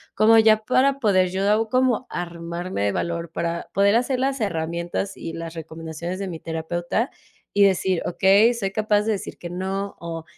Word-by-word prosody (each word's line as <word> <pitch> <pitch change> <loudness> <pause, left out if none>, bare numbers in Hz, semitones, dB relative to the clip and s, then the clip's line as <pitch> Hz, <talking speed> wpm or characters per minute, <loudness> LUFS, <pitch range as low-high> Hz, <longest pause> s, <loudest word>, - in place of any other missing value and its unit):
como 225 +1 +6
ya 220 -1 +5
para 270 +4 +2
poder 190 -6 +3
yo 205 +4 +1
como 255 0 +1
armarme 170 - -4
de 100 - +2
valor 170 -1 -3
para 170 0 -3
poder 200 +2 +4
hacer 250 +1 0
las 270 +1 0
herramientas 170 0 -2
y 165 - -6
las 165 0 -6
recomendaciones 165 +2 -6
de 195 -1 -3
mi 165 -2 -6
terapeuta 175 - -2 0.4
y 200 0 +5
decir: 190 -2 +1
"Okay, 200 +6 +4
soy 200 -5 -3
capaz 210 0 +2
de 220 +1 -1
decir 200 - -6
que 170 - -7
no", 190 +3 -4
o 165 -1 -6
190 Hz, 175 wpm, -23 LUFS, 170-215 Hz, 0.4 s, como